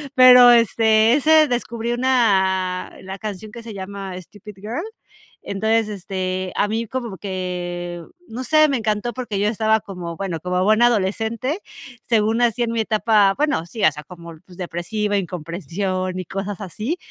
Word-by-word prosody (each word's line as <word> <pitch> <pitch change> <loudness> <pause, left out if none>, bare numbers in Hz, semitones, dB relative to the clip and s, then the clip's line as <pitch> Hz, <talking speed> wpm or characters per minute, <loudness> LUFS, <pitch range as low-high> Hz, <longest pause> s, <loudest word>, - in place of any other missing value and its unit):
Pero, 250 -1 +9
este, 225 -1 +4
ese 310 +2 +5
descubrí 235 -2 -3
una, 190 -8 +1
la 190 +1 -7
canción 215 0 -6
que 235 - -9
se 230 -1 -9
llama 195 -1 -6
Stupid 205 +3 -13
Girl. 220 - -5 0.6
Entonces, 220 +2 0
este, 185 -2 -4
a 205 - +1
mí 225 +2 -2
como 230 -4 -5
que, 175 -2 -4 0.3
no 245 +3 -6
sé, 310 +4 +4
me 275 - +1
encantó 220 +1 -2
porque 230 -5 -4
yo 205 - +1
estaba 220 0 +2
como, 175 -4 -7
bueno, 185 -4 -3
como 180 +2 -1
buena 215 +4 +5
adolescente, 230 - -1 0.5
según 225 +1 +2
así 240 0 +2
en 230 - -1
mi 230 - -1
etapa, 215 -2 +3
bueno, 295 - +1
sí, 220 +4 -6
o 155 - +6
sea, 150 +1 -10
como, 170 +1 -11
pues, 180 -2 -16
depresiva, 195 +4 -2
incomprensión 185 +1 -3
y 185 - -4
cosas 195 +3 -5
así. 215 - -4
210 Hz, 160 wpm, -21 LUFS, 185-230 Hz, 0.6 s, Pero